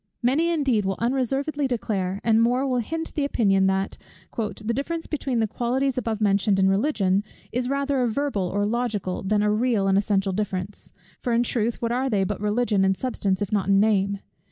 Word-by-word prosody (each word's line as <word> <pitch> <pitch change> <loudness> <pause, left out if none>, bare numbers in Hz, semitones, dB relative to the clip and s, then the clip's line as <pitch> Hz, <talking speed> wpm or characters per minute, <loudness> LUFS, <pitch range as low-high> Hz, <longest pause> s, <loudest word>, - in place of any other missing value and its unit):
Many 290 +8 +2
indeed 275 -10 +1
will 195 0 -1
unreservedly 270 +4 0
declare, 200 -6 -2
and 225 -1 +4
more 250 +3 +2
will 255 -2 0
hint 325 +8 -3
the 295 - -1
opinion, 195 -8 +2
that 190 +1 -1 0.4
"the 225 0 -3
difference 325 +5 -3
between 275 -5 -2
the 225 -1 +2
qualities 250 +4 -1
above 225 -3 -2
mentioned 200 -1 +2
and 190 0 +3
Religion, 200 -4 +1 0.3
is 250 +1 -1
rather 280 -1 0
a 245 - +2
verbal 220 -7 -1
or 205 +1 0
logical, 210 -5 -2
than 205 +2 +1
a 210 - +2
real 225 -2 +1
and 195 0 +4
essential 195 -1 0
difference; 195 -1 -4 0.3
for 245 - -1
in 235 +1 +3
truth 235 -1 -1
what 230 - 0
are 260 +2 0
they 200 -5 +1
but 200 +1 -3
Religion 210 -1 +1
in 190 0 +3
substance 205 -5 -1
if 200 - -6
not 205 -3 0
in 195 0 +4
name? 200 -1 +2
220 Hz, 195 wpm, -24 LUFS, 195-255 Hz, 0.4 s, and